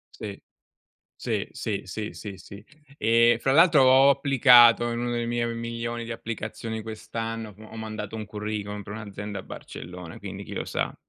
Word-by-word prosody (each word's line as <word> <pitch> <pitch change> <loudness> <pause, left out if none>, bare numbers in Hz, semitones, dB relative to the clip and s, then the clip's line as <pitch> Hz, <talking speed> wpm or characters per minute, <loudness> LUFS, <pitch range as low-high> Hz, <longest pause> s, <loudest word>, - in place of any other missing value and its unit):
Sì, 100 -2 -7 0.7
sì, - - -3
sì, 100 -2 -3
sì, 105 +3 -5
sì, 100 -3 -8
sì. 100 +2 -12 0.3
Ehm, 115 +1 +4
fra 135 +3 +1
l'altro, 160 -2 +6
ho 135 +2 +7
applicato 125 -4 +6
in 115 - -2
uno 120 0 -2
delle 120 0 -1
mie 120 0 0
milioni 115 0 -4
di 115 - -5
applicazioni 110 0 -5
quest'anno, 115 0 -5
ho 110 +1 -12
mandato 110 -1 -5
un 110 -1 -5
curriculum 105 -1 -4
per 100 - -9
un'azienda 105 -1 -6
a - - -7
Barcellona, 90 -2 -9
quindi - - -7
chi - - -10
lo - - -3
sa. - - -2
115 Hz, 170 wpm, -26 LUFS, 105-120 Hz, 0.7 s, ho